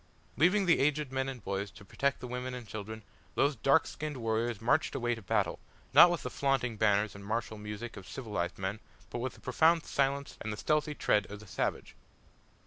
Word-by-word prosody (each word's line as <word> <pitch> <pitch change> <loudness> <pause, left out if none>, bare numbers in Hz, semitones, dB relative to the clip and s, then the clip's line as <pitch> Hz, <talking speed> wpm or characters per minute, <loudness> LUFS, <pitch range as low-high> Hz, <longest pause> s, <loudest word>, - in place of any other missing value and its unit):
Leaving 185 - +4
the 170 - +4
aged 150 0 +1
men 130 0 -1
and 125 -5 -7
boys 100 +1 -2
to 100 - -15
protect 140 +8 -1
the 125 - -5
women 125 +1 -4
and 120 -3 -8
children, 110 +2 -6 0.3
those 145 0 +3
dark 135 +6 +4
skinned 150 -2 -5
warriors 115 -1 -1
marched 125 +8 +2
away 120 0 0
to 115 - -6
battle 95 - 0 0.3
not 175 - +10
with 175 -2 -2
the - - -3
flaunting 135 -4 0
banners 105 -1 +2
and 100 - -10
martial 110 +1 -3
music 105 +3 -6
of 95 - -10
civilised 105 -9 -3
man, 95 +3 -3 0.3
but 120 - -3
with 130 +1 -3
the - - -16
profound 160 +6 +3
silence 140 0 -1
and 110 - -3
the 105 - -5
stealthy 150 +4 +1
tread 105 -7 +2
of 105 0 -7
the 105 - -12
savage. - - -3
120 Hz, 205 wpm, -31 LUFS, 105-140 Hz, 0.3 s, not